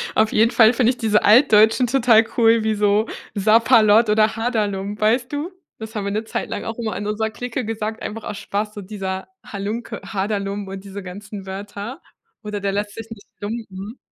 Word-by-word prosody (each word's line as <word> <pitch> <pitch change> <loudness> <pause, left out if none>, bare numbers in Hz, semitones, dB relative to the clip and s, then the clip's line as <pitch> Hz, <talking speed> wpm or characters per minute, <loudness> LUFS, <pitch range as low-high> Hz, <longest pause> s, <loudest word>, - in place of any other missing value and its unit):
auf 220 0 +3
jeden 225 +2 +3
Fall 225 -1 +6
finde 245 0 +3
ich 250 - -8
diese 215 -2 +2
Altdeutschen 220 +1 +5
total 230 -3 +4
cool, 230 -1 +4
wie 220 0 +1
so 210 +1 +2 0.3
Sapperlot 220 +1 +5
oder 215 +1 +3
Haderlump, 210 -3 -2
weißt 240 +4 +2
du? 295 +5 -3 0.3
Das 220 +1 -8
haben 205 -2 -3
wir 200 - -2
'ne 215 +2 -1
Zeit 225 - -4
lang - - -4
auch 225 +1 -5
immer 225 -2 -3
in 205 - -4
unserer 220 +1 -1
Clique 245 +2 -5
gesagt, 220 0 -4
einfach 225 +1 -6
aus 205 - -5
Spaß, 210 +2 -3
so 205 - -7
dieser 190 -1 -5 0.2
Halunke, 210 +4 -5
Haderlump 200 -1 -3
und 195 0 -7
diese 200 0 -8
ganzen 200 +2 -8
Wörter 200 +5 -7 0.4
oder 210 -1 -4
„der 200 0 -1
lässt 205 +1 -3
sich 225 0 -8
nicht 220 -3 -11 0.2
lumpen“. 210 0 -6
215 Hz, 190 wpm, -21 LUFS, 205-225 Hz, 0.4 s, Fall